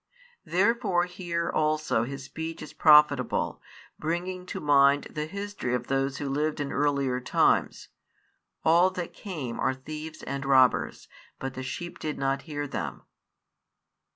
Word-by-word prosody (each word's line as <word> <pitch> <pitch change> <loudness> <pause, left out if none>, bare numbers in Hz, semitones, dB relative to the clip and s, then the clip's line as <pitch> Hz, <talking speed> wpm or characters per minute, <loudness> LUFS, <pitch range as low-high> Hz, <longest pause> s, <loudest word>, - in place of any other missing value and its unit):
Therefore 195 -1 +2
here 175 -2 -3
also 155 -6 +1
his 135 +1 -6
speech 160 +4 -6
is - - -10
profitable, 150 -4 +4 0.4
bringing 180 +3 -3
to - - -5
mind 140 -1 +4
the 150 -1 -3
history 200 -9 -3
of 125 - -3
those 135 0 0
who 145 - -4
lived 150 +3 -1
in 145 -1 -2
earlier 140 -3 +1
times: 125 - +1 0.8
All 170 +3 +5
that 180 -2 -5
came 150 - -6
are 130 - +1
thieves 155 +4 -8
and 140 0 -4
robbers: 130 -2 +3 0.3
but 135 0 -5
the 130 - -6
sheep 150 +7 -6
did 155 -1 -3
not 135 0 0
hear 145 -1 -3
them. 70 - -5
150 Hz, 140 wpm, -27 LUFS, 135-170 Hz, 0.8 s, All